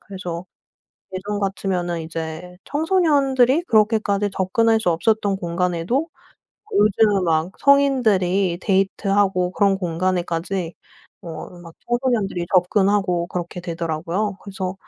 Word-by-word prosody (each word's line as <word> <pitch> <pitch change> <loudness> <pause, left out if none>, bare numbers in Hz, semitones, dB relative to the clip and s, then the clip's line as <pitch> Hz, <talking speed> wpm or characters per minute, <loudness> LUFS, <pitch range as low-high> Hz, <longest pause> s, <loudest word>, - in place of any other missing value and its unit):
그래서 180 -2 -7 0.7
예전 205 +2 -3
같으면은 180 -4 -2
이제 165 +2 -6
청소년들이 290 -4 +2
그렇게까지 215 - +2
접근할 225 +4 +2
수 180 - +1
없었던 200 +4 +1
공간에도 180 - -1 0.6
요즘은 210 - +3
막 160 +2 0
성인들이 205 -11 +3
데이트하고 195 -1 +1
그런 200 0 +2
공간에까지 175 0 -2 0.5
어 160 -2 -7
막 165 -1 -13
청소년들이 240 -8 0
접근하고 185 -1 +2
그렇게 175 0 -5
되더라고요. 170 +4 -3
그래서 190 -2 -5
190 Hz, 300 characters per minute, -21 LUFS, 175-215 Hz, 0.7 s, 요즘은